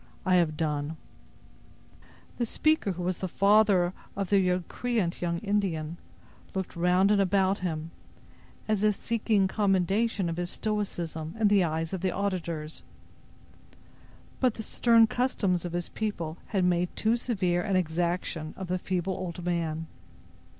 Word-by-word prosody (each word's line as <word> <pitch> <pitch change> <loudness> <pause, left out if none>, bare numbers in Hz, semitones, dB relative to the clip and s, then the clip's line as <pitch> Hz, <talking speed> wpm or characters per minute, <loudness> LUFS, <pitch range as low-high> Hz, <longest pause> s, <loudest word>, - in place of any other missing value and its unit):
I 185 - +3
have 155 -3 +1
done." 150 0 -2 1.4
The 240 - +2
speaker, 310 -7 +1
who 180 0 -5
was 180 0 -1
the 190 - -2
father 200 -2 +4 0.2
of 195 -1 -3
the 195 -2 +4
recreant 185 +2 -1
young 170 -1 0
Indian, 180 -6 -1 0.6
looked 190 -1 -3
round 180 +3 +3
and 205 -1 +4
about 195 0 +2
him, 165 -3 -3 0.8
as 215 -2 +1
if 210 -1 +3
seeking 215 -3 +1
commendation 195 +1 +1
of 165 0 -3
his 175 0 -2
stoicism 175 -7 -3
in 215 -2 +4
the 200 -2 +4
eyes 160 +1 -2
of 185 - -3
the 190 - +1
auditors. 170 -5 -3 1.6
But 255 -4 +2
the 220 - -5
stern 230 0 +5
customs 220 -8 0
of 175 - -5
his 175 -1 -2
people 170 -7 -4
had 190 -4 +1
made 175 0 +2
too 220 +2 +2
severe 190 -8 0
an 195 +2 -1
exaction 170 -2 -1
of 190 -2 -6
the 185 0 0
feeble 185 +1 -1
old 175 -1 -5
man. 165 -2 -1
185 Hz, 145 wpm, -28 LUFS, 170-205 Hz, 1.6 s, stern